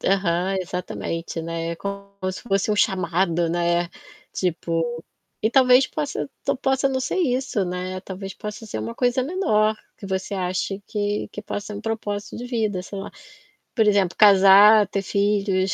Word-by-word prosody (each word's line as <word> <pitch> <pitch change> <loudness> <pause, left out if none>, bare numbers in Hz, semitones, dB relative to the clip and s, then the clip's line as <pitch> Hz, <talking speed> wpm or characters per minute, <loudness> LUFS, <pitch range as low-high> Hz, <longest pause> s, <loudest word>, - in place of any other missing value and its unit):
Aham, 190 0 +1
exatamente, 170 -2 -4
né, 165 0 -4
é 170 - -4
como 200 +1 -6 0.2
se - - -8
fosse 195 -2 0
um - - -1
chamado 175 -4 +1
né, 175 0 +1 0.4
tipo, 170 -2 -1 0.6
e 220 - +2
talvez 255 0 +6
possa 290 -2 -3 0.2
to - - +1
possa 265 +1 +1
não 260 -1 -1
ser 260 - -2
isso 255 - 0
né, 180 +1 -4
talvez 195 0 -7
possa 210 +1 -7
ser 110 - -4
uma 115 +2 -5
coisa 245 +1 +1
menor, 220 - +1 0.2
que - - -12
você 190 +1 -3
ache 190 +2 -2
que 205 -1 -2
que 210 - -7
possa 205 0 -5
ser 210 - -6
um 205 - -6
propósito 215 -2 -4
de 245 - -6
vida, 215 -6 -1
sei 200 +1 -7
lá. 195 - -6 0.6
Por 220 -3 +3
exemplo 200 -3 +2
casar, 205 +1 +8
ter 195 0 -2
filhos, 200 -1 +1
200 Hz, 170 wpm, -23 LUFS, 185-215 Hz, 0.6 s, casar